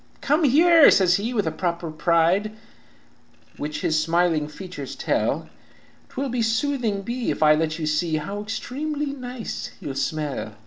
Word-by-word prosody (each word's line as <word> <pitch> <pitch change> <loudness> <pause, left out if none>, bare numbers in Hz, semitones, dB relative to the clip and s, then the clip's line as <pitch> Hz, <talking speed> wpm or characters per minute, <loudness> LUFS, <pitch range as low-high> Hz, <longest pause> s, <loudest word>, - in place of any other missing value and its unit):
"'Come 300 +3 +2
here,' 325 +3 +7
says 180 -1 +4
he, 220 +4 -3
with 215 -5 0
a 160 - 0
proper 170 0 -3
pride, 170 +6 +2 1.0
Which 150 +1 -4
his 155 -1 +1
smiling 165 -2 +1
features 150 -4 -8
tell, - - -1 0.3
' - - -31
'Twill 250 -2 -2
soothing 225 -3 0
be 240 +3 -3
if - - 0
I 150 0 +7
let 155 0 0
you 160 - -3
see, 155 +1 0
How 195 +7 -4
extremely 285 +6 -4
nice 250 -3 -6
you'll 140 - -5
smell.' 135 -5 -3
185 Hz, 150 wpm, -23 LUFS, 155-250 Hz, 1.0 s, here